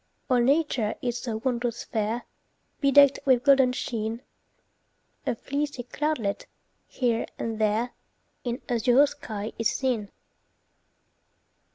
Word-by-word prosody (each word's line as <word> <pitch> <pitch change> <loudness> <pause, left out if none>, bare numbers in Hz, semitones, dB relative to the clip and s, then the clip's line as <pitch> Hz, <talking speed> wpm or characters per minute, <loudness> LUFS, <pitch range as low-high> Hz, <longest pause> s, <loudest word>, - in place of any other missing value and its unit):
All 250 - +5
nature 255 -4 +2
is 245 -1 -1
so 225 -3 -4
wondrous 240 -2 -1
fair, 220 +2 -2 0.5
Bedecked 280 -1 +6
with 255 -3 +3
golden 270 -3 +5
sheen 230 -1 -3 1.0
A - - +1
fleecy 280 +1 -3
cloudlet, 250 -5 -2 0.4
here 235 -3 0
and 225 -1 -3
there, 220 +3 +1 0.5
In 245 +2 -3
azure 245 +3 +4
sky 220 -7 -6
is 230 - +2
seen. 240 -6 -1
245 Hz, 105 wpm, -26 LUFS, 225-270 Hz, 1.0 s, Bedecked